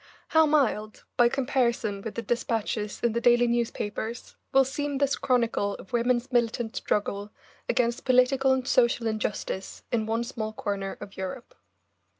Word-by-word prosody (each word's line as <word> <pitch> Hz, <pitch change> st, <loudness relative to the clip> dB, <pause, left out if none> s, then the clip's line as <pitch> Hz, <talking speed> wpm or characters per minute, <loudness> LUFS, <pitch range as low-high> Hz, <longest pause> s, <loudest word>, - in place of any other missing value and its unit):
How 320 Hz, -1 st, +5 dB
mild, 225 Hz, -8 st, +1 dB
by 240 Hz, -1 st, +5 dB
comparison 240 Hz, -6 st, 0 dB
with 220 Hz, +1 st, -6 dB
the 230 Hz, -, -3 dB
despatches 225 Hz, -3 st, -2 dB
in 235 Hz, -2 st, +2 dB
the 235 Hz, -, -1 dB
daily 240 Hz, 0 st, +5 dB
newspapers, 235 Hz, -1 st, -2 dB, 0.2 s
will 270 Hz, 0 st, +5 dB
seem 285 Hz, +1 st, -2 dB
this 280 Hz, 0 st, +2 dB
chronicle 230 Hz, -5 st, +1 dB
of 190 Hz, -, -13 dB
women's 240 Hz, +2 st, +1 dB
militant 235 Hz, -2 st, 0 dB
struggle 205 Hz, 0 st, -1 dB, 0.4 s
against 240 Hz, -1 st, +1 dB
political 260 Hz, +1 st, +4 dB
and 260 Hz, -1 st, 0 dB
social 235 Hz, -3 st, +3 dB
injustice 210 Hz, -3 st, -3 dB
in 220 Hz, -2 st, 0 dB
one 225 Hz, +1 st, 0 dB
small 225 Hz, -3 st, -4 dB
corner 200 Hz, -2 st, -3 dB
of 195 Hz, -, -10 dB
Europe. 190 Hz, +6 st, -6 dB
235 Hz, 150 wpm, -27 LUFS, 215-255 Hz, 0.4 s, How